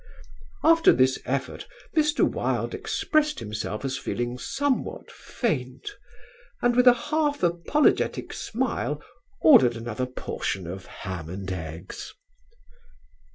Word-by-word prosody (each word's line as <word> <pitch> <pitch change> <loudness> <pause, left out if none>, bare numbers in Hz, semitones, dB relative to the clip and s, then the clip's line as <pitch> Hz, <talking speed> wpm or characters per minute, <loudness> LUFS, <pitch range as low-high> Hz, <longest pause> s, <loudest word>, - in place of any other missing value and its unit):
"After 330 0 +6
this 130 0 +3
effort 135 +1 -3 0.3
Mr. 300 -1 +3
Wilde - - -1
expressed 305 -1 0
himself 105 +1 -4
as 130 -1 -2
feeling 120 +1 -3
somewhat 275 - -2
faint; 135 - -3 0.7
and 245 0 +2
with 250 +1 +5
a 245 - +10 0.2
half 295 -6 +1
apologetic 175 - +1
smile - - -2 0.4
ordered 230 - +7
another 120 +2 -3
portion 95 -6 -4
of 90 +2 -7
Ham 85 -5 -7
and 95 +1 -5
Eggs." 80 0 -7
130 Hz, 110 wpm, -26 LUFS, -, 0.7 s, a